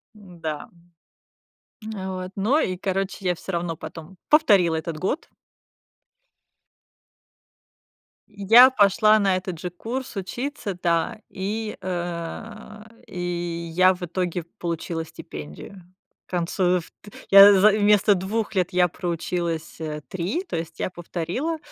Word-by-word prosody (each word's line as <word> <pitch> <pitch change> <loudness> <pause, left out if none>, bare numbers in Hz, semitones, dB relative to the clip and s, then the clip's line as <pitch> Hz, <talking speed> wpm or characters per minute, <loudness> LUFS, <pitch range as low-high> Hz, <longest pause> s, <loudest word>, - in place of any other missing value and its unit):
М-да, 170 -7 -7 1.1
м. 215 - -7
А 190 -1 -4
вот, 185 0 -5
ну 220 +10 +2
и 185 -11 0
короче, 195 +1 -3
я 180 - +2
всё 190 - -7
равно 170 -1 -2
потом 165 +4 -10
повторила 200 - +5
этот 160 0 -4
год. 230 - -2 3.0
Я 220 +5 +7
пошла 215 -2 +4
на 195 -2 +2
этот 185 -3 -4
же 180 - -4
курс 235 +9 -6
учиться, 205 +1 -4
да, 170 +4 0
и, 210 +3 -4
э, 185 +5 -6 0.2
и 175 -2 -4
я 185 +2 +5
в 180 - -9
итоге 175 0 -2 0.2
получила 165 -1 -3
стипендию. 75 - -10 0.5
К - - -24
концу 180 +1 +1
вт 160 - -13 0.4
я, 200 +1 +10
в 200 +2 +6
вместо 205 0 +4
2 205 +3 -3
лет 185 -1 +1
я 180 -1 +3
проучилась, 170 -1 -3
э, 150 -1 -4
3, 190 - -3
то 175 - -6
есть 165 0 -5
я - - -1
повторила, 180 - -3
185 Hz, 125 wpm, -24 LUFS, 170-205 Hz, 3.0 s, я